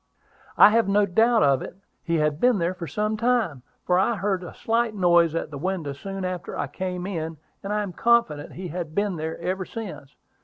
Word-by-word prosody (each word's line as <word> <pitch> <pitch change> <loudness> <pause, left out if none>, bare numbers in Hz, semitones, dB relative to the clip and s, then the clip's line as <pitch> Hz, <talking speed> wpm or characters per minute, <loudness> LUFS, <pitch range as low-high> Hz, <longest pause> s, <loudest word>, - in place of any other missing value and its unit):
"I - - +9
have 225 -1 +3
no 205 +1 +3
doubt 225 +4 +3
of 135 -2 +3
it: - - -7 0.3
he 170 - -1
had 150 -1 +1
been 245 0 +4
there 175 0 0
for 175 -2 -7
some 215 +2 -1
time, 230 - +1 0.2
for 180 0 +3
I 230 +5 +2
heard 195 -1 -1
a 175 - -7
slight 230 -1 0
noise 170 -4 +4
at 165 - -3
that 145 - -6
window 170 -4 -2
soon 195 +6 -6
after 185 -1 -4
I - - -1
came 180 -1 -4
in; 165 -4 -4 0.2
and 195 - -5
I 210 0 0
am 190 -3 -6
confident 230 -10 +1
he 180 0 -6
had 165 -1 -5
been 200 -2 0
there 160 +1 -4
ever 185 +2 -2
since. 185 - -8
185 Hz, 215 wpm, -25 LUFS, 165-210 Hz, 0.3 s, I